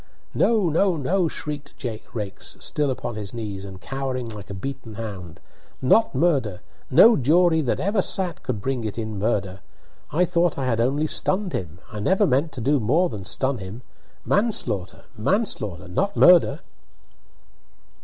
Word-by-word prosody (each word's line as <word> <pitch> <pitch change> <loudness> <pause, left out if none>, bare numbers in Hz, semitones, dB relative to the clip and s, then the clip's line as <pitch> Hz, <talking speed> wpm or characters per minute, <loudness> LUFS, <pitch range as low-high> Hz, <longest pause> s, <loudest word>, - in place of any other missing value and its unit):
"No! 220 -6 +3
no! 170 +3 +2
no!" 170 +5 +1
shrieked 150 -2 -6 0.4
Raikes, 105 -4 -6
still 145 -2 -1
upon 125 -2 -3
his 105 +1 -6
knees, 105 -4 -5
and 95 -1 -9
cowering 130 0 -4
like 105 -3 -9
a 100 - -5
beaten 125 +1 -6
hound, 95 -7 -7 0.4
"Not 220 - +3
murder! 130 - +1 0.3
No 215 - +7
jury 160 +4 +3
that 130 - -1
ever 200 +1 +1
sat 185 -2 -2
could 115 -6 -3
bring 130 -1 -2
it 110 -1 -4
in 110 -3 -4
murder. 100 -3 -1 0.5
I 175 +4 +3
thought 175 -1 +1
I 135 - -2
had 115 -3 +1
only 140 +6 +1
stunned 185 +3 +1
him 90 -9 -4
I 105 - -6
never 190 - +3
meant 145 +1 +1
to 125 - -5
do 140 +4 +2
more 155 +11 +2
than 100 - -7
stun 130 +4 0
him! 100 +6 -8 0.4
Manslaughter 120 - 0
manslaughter 105 - -1
not 200 - -1
murder!" 180 -2 +6
130 Hz, 155 wpm, -23 LUFS, 105-170 Hz, 0.5 s, No